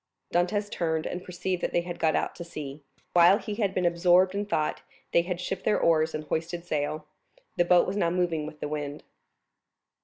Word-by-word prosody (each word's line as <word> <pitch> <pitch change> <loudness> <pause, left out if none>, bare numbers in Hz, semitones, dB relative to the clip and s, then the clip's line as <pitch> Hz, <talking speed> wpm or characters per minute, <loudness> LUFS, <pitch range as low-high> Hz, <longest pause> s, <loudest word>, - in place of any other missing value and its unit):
Dantès 185 +4 +1
turned 160 -2 -1
and 180 +1 -4
perceived 180 0 -3
that - - -2
they 175 - +3
had 175 0 -7
got 160 -1 +2
out - - 0
to 170 - -7
sea. 150 -3 -7 0.3
While 175 +3 +7
he 215 -1 -5
had 205 -2 0
been 185 -1 -1
absorbed 175 +2 +4
in 205 +1 -2
thought, 155 -7 -1 0.3
they 170 - +5
had 175 0 -4
shipped 180 +1 -4
their - - +2
oars 160 -1 +2
and 155 - -4
hoisted 170 +3 -3
sail; 155 -1 -2 0.5
the 175 - +3
boat 175 0 +5
was 190 +2 -3
now 170 -4 +2
moving 170 -3 0
with 155 -1 -11
the - - -2
wind. 145 -1 -4
175 Hz, 205 wpm, -27 LUFS, 155-180 Hz, 0.5 s, While